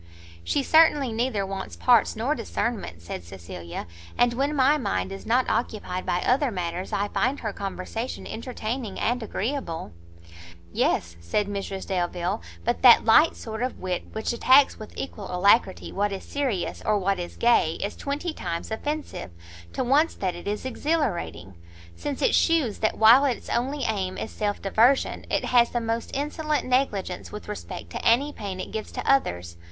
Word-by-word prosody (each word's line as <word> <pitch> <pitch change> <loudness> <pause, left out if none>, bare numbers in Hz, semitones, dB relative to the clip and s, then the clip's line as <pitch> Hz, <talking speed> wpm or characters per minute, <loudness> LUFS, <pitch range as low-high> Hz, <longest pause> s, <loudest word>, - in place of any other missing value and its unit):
"She 280 - 0
certainly 300 -4 +5
neither 225 -3 0
wants 195 0 -5
parts 240 -4 +4
nor 240 +7 0
discernment," 210 - -3
said 85 - -6
Cecilia; 85 -1 -8 0.3
"and, 245 0 +4
when 280 +4 0
my 275 +2 +4
mind 95 - -1
is 95 0 -8
not 250 +2 +3
occupied 205 -6 -2
by 175 - +1
other 265 +2 +2
matters, 180 -2 -4
I 205 +1 0
find 260 +7 0
her 215 -3 -3
conversation 200 +5 -5
entertaining 230 -2 -4
and 245 +2 0
agreeable." 220 - -3 0.8
"Yes," 85 -1 0
said 85 - 0
Mrs 195 -1 -4
Delvile, 180 +1 -1 0.2
"but 240 - 0
that 245 -2 +8
light 300 +9 +6
sort 220 0 -6
of 255 +1 -2
wit 180 -1 -3
which 220 +2 -2
attacks, 260 +3 +5
with 215 - -9
equal 210 -7 -5
alacrity, 190 +2 +3
what 205 +1 0
is 195 - -5
serious 260 -11 -2
or 215 -1 +2
what 195 -1 0
is 175 - -6
gay, 235 -9 +3
is 200 - -4
twenty 295 +4 -3
times 170 - -5
offensive, 295 - -4 0.4
to - - -1
once 285 +6 +3
that 185 -2 -2
it 175 +2 -9
is 210 +4 -3
exhilarating; 235 - -2 0.4
since 285 -2 -4
it - - +3
shews 315 -10 +2
that 215 - 0
while 230 +5 +8
its 260 -5 -1
only 270 +4 -1
aim 195 -5 -1
is - - -5
self 205 -1 -2
diversion, 230 +7 +2
it - - 0
has 240 -1 +4
the 240 - -1
most 230 0 -2
insolent 300 +2 -1
negligence 250 -8 -1
with 210 - -8
respect 210 -1 -7
to - - -5
any 275 +6 +3
pain 195 -3 -6
it - - -6
gives 220 - -5
to - - -5
others. 90 - +1
220 Hz, 170 wpm, -25 LUFS, 190-260 Hz, 0.8 s, that